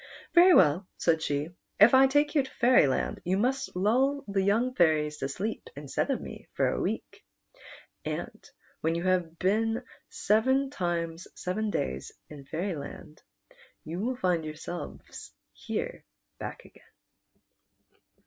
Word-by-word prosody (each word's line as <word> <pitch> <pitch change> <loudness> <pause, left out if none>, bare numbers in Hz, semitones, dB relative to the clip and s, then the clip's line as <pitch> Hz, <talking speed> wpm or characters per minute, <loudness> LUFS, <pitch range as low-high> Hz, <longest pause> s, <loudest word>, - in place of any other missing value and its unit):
"Very 355 +1 +8
well," 175 +3 +4
said 160 -2 +2
she; 145 0 -1 0.3
"if 210 +5 +8
I 265 +1 +7
take 290 +2 +2
you 295 - +4
to 265 - -8
Fairyland, 235 - +3
you 185 +2 0
must 255 +3 -1
lull 260 +9 +2
the 200 -1 0
young 225 +6 +2
fairies 155 -6 +2
to 135 - -3
sleep 210 +10 -4
instead 140 -1 -2
of - - 0
me - - -10
for - - +2
a - - -2
week, - - -4 0.8
and - - -5 0.4
when 165 +1 0
you 170 - -2
have 180 -3 0
been 225 +6 +1 0.3
seven 260 +6 +2
times 170 - -3
seven 210 +4 -2
daj 65 - -1
s 65 - -10 0.2
in 145 -2 -11
Fairxdand 155 -2 -5 0.6
you 165 +3 -5
will 250 +5 -1
find 180 -7 0
yourselves 155 +3 -8 0.2
here - - -4 0.4
back - - -7
again." - - -18
185 Hz, 140 wpm, -28 LUFS, 160-245 Hz, 0.8 s, Very